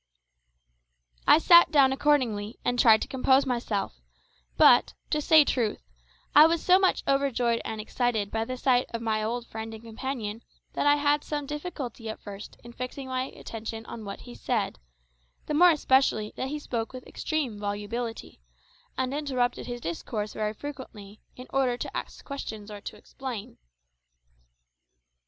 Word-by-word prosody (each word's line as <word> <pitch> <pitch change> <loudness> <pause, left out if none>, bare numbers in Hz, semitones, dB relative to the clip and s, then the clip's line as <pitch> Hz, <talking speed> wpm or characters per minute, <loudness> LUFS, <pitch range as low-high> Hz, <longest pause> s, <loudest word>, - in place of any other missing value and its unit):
I - - +8
sat 340 +1 +7
down 275 -3 +5
accordingly, 250 -7 +1
and 245 0 0
tried 225 -4 +6
to - - -6
compose 265 +1 +3
myself; 225 - -2 0.6
but, - - +6 0.2
to 300 - +1
say 310 -1 +6
truth, 235 -6 0 0.5
I 300 +2 +9
was 330 0 0
so 365 +1 +6
much 380 -1 +2
overjoyed 255 -4 +1
and 220 - -5
excited 220 -2 -1
by 225 0 -1
the 255 +2 -5
sight 250 -1 +2
of 230 - -4
my 220 -1 0
old 235 +2 -2
friend 220 -1 -7
and 220 - -12
companion 225 -1 -5 0.3
that - - 0
I 290 - +6
had 290 0 +2
some 295 -1 -3
difficulty 285 -6 -6
at 220 - -6
first 205 0 -10
in 240 0 -11
fixing 255 +2 -6
my 255 0 -1
attention 225 -3 -7
on 225 -1 -8
what 200 -1 -7
he 120 - -11
said, 115 - -2 0.7
the - - -3
more 350 +4 +7
especially 265 -8 +2
that 260 - -3
he 295 +3 -3
spoke 235 -6 -4
with 255 -1 -9
extreme 280 -10 -3
volubility, 210 - -5 0.6
and 260 0 -1
interrupted 255 -5 -1
his 240 -1 -5
discourse 210 +5 -4
very 215 0 -2
frequently, 220 -7 -9
in 250 - -10
order 260 -3 +1
to - - -6
ask - - -6
questions 220 -7 -6
or 205 -1 -8
to - - -7
explain. 250 -6 -8
245 Hz, 160 wpm, -27 LUFS, 220-275 Hz, 0.7 s, I